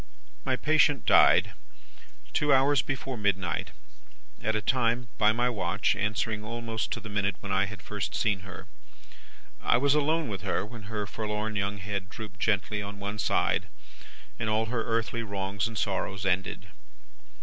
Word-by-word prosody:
"My 130 - +1
patient 150 0 +3
died, - - +6 0.8
two 150 -1 +2
hours 135 0 +5
before 135 -1 -4
midnight 95 -3 0 0.7
at 110 0 0
a - - +2
time, 120 0 +1
by 105 -1 +6
my 120 +3 +1
watch, 100 -4 +1
answering 105 0 -1
almost 115 0 -3
to - - -4
the 110 - -9
minute 100 -1 0
when 100 - -6
I 95 0 +3
had 105 0 -9
first 105 -1 -3
seen 105 -3 +1
her. 95 -2 -10 1.0
I - - +4
was 140 +3 +3
alone 155 +1 +2
with 100 -4 -4
her, - - -1
when 110 -1 -10
her 105 -2 -2
forlorn 105 +1 -3
young 100 0 -1
head 100 0 -4
drooped 105 -1 -9
gently 105 -1 +1
on 100 0 -6
one 100 +1 -4
side, - - +1 0.7
and 110 - -1
all 110 +1 +2
her 115 0 -1
earthly 115 +1 -1
wrongs 100 0 -2
and 115 -2 -6
sorrows 95 -1 -1
ended. 95 0 -1
105 Hz, 160 wpm, -28 LUFS, 100-115 Hz, 1.0 s, died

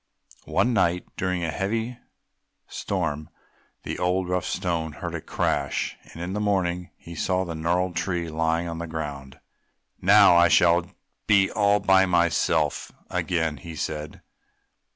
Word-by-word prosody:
One 125 - +2
night 90 -5 +1
during 90 -1 -1
a 80 - -1
heavy 115 +7 -2 0.7
storm 80 -5 -3 0.5
the - - -5
old, 90 +1 0
rough 90 -1 0
Stone 85 -4 -2
heard 85 0 -6
a 85 - -4
crash, 70 -2 -1 0.2
and 85 - -7
in 90 +2 -4
the 105 - -2
morning 90 -3 0
he 85 - -11
saw 95 +3 0
the 85 - -5
gnarled 85 +3 0
tree 90 -4 -1
lying 80 +1 0
upon 85 -1 -5
the 85 - -4
ground. 70 -4 -6 0.6
"Now 100 -1 +7
I 85 0 +6
shall 85 0 +3 0.4
be 100 -2 +4
all 105 -2 +3
by 95 -1 +4
myself 85 -3 +1 0.2
again!" 80 -4 -1
he 80 +5 -9
said. 75 -1 -5
85 Hz, 145 wpm, -25 LUFS, 80-95 Hz, 0.7 s, Now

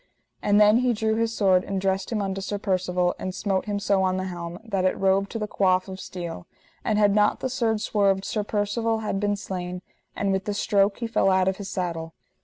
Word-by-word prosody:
And 205 0 +3
then 210 +1 +6
he 250 -1 +2
drew 220 0 0
his 225 0 0
sword, 190 -5 +3
and 195 -1 -3
dressed 190 +1 -1
him 210 -3 0
unto 195 0 -3
Sir 205 +2 -3
Percivale, 180 -3 0
and 185 0 -4
smote 195 -3 -1
him 205 -1 -2
so 200 -1 +2
on 185 0 +1
the 185 - -2
helm, 175 -2 -5
that 200 -5 -1
it 185 - +1
rove 195 +1 +2
to - - -4
the 210 -1 -3
coif 185 -2 +2
of 190 0 -7
steel; 170 - -7 0.4
and 215 - +1
had 205 -1 +4
not 210 0 +3
the 260 - -2
sword 225 -4 0
swerved 195 -3 +1
Sir 210 - -1
Percivale 220 +2 -1
had 195 -2 -1
been 205 0 +1
slain, 180 -2 -5 0.3
and 200 -1 0
with 190 +1 -1
the 205 - -2
stroke 200 -1 +2
he 235 - -3
fell 225 -3 +2
out 190 0 +3
of 190 0 +1
his 200 -2 -6
saddle. 165 -3 -4
195 Hz, 230 wpm, -25 LUFS, 185-210 Hz, 0.4 s, then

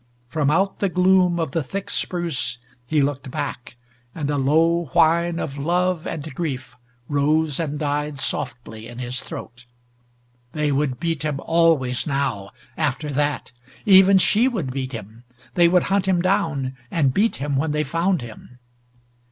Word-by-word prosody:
From 145 0 0
out 190 +6 +1
the 200 - +1
gloom 180 -1 +3
of 160 -5 -2
the 165 - 0
thick 195 +7 -5
spruce 165 -9 -2 0.3
he 150 +1 +2
looked 140 -1 -2
back, 125 -1 -5 0.4
and 150 -2 -2
a - - 0
low 165 +5 +2
whine 170 0 +3
of 140 -4 -4
love 175 +2 0
and 155 -1 -5
grief 135 -6 -4 0.3
rose 150 +1 +1
and 150 -3 -2
died 150 0 -2
softly 115 -4 -4
in 120 - -10
his 125 0 -2
throat. 120 +1 -9 0.9
They 150 -1 0
would 135 -3 0
beat 165 -3 -2
him 150 -3 -2
always 160 -7 +2
now 135 -9 -1 0.3
after 150 0 -1
that. 145 -1 -1 0.3
Even 195 -1 +7
she 215 +6 +4
would 190 - -2
beat 130 0 -4
him. 110 +1 -9 0.3
They 175 -1 +5
would 180 0 +3
hunt 195 -1 0
him 185 -2 +3
down, 155 -8 0
and 140 -6 +1
beat 220 +7 +2
him 140 +1 -2
when 150 +3 0
they 150 0 0
found 165 +2 0
him. 120 +2 -12
150 Hz, 160 wpm, -22 LUFS, 135-170 Hz, 0.9 s, Even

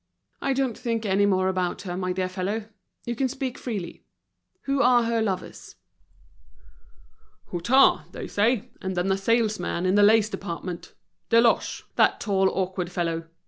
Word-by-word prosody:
"I 275 - +1
don't 265 -4 0
think 230 -3 -3
any 200 0 +3
more 185 -1 +2
about 185 -1 -1
her, 175 -3 -4
my 185 0 -2
dear 185 0 -1
fellow. 195 +4 -3 0.4
You 240 - -3
can 265 +3 +1
speak 260 -1 -5
freely. 205 -8 -5 0.6
Who 275 0 0
are 245 -2 +5
her 230 0 0
lovers?" 195 -4 -4 1.8
"Hutin, 235 +11 +3
they - - -7
say, 230 +3 0
and 190 -1 -4
then 180 +2 +1
a 190 - +2
salesman 210 -4 0
in 185 - +2
the 205 - +5
lace 215 +1 +5
department—Deloche, 200 +6 -1
that - - +4
tall 195 -3 +2
awkward 185 -2 -3
fellow. 165 -2 -2
200 Hz, 145 wpm, -25 LUFS, 185-230 Hz, 1.8 s, are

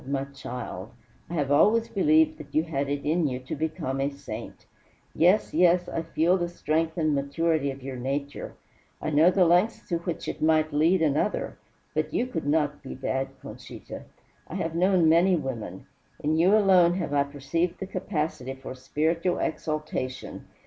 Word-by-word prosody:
My 135 -1 -1
child! 125 -7 -7 0.4
I 175 - -4
have 145 -3 0
always 225 +10 +4
believed 310 +8 +3
that - - -11
you 155 - +4
had 140 -4 -2
it 145 0 -3
in 160 +1 +2
you 125 -2 -2
to 130 - -5
become 155 -3 -2
a 140 - +1
saint. 125 -6 -9 0.5
Yes, 180 +6 +3
yes, 175 +1 +4
I - - -2
feel 165 +2 +2
the 175 -1 -2
strength 160 0 -1
and 155 -2 +1
maturity 140 +1 0
of 135 -1 -7
your 135 -1 -5
nature, 140 +3 -4 0.4
I 155 - -3
know 155 +4 +6
the 185 0 +4
lengths 180 +7 +2
to 170 -2 0
which 170 0 -5
it - - -5
might 155 -1 +2
lead 165 +4 +3
another; 155 +7 0 0.3
but - - -2
you - - +2
could 165 - -4
not 145 -1 +1
be 135 - -8
bad, 135 0 -2 0.2
Conchita. - - -9 0.4
I - - -7
have 165 0 -2
known 180 0 +3
many 175 +4 +5
women. 115 - -5 0.4
In 155 +1 +1
you 185 +6 +5
alone 185 -4 +5
have 170 -6 -3
I 140 - +4
perceived 145 +5 -2
the - - -4
capacity 150 -8 -3
for 135 -1 -8
spiritual 160 +7 -1
exaltation. 155 -5 -4
155 Hz, 175 wpm, -26 LUFS, 140-175 Hz, 0.5 s, know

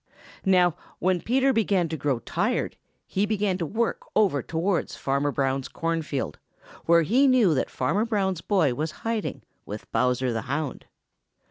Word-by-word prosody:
Now, 180 -3 +4 0.2
when 185 -1 +1
Peter 265 +3 +2
began 200 -6 +2
to 160 - -2
grow 140 -3 0
tired 115 - -1 0.3
he 200 +2 0
began 205 -3 0
to 165 - -1
work 230 +7 -1
over 195 -10 +3
towards 170 +6 -1
Farmer 140 +1 0
Brown's 135 -1 -1
corn 165 -1 -2
field, 140 -3 -4 0.5
where 170 0 +5
he 250 - +4
knew 245 -10 +5
that 135 - 0
Farmer 195 - 0
Brown's 195 -6 0
boy 170 - +2
was 155 +5 -2 0.2
hiding, 225 -2 -2 0.2
with 105 +1 -8
Bowser 125 +1 +1
the 115 - -1
Hound. 145 0 -3
170 Hz, 155 wpm, -26 LUFS, 140-205 Hz, 0.5 s, where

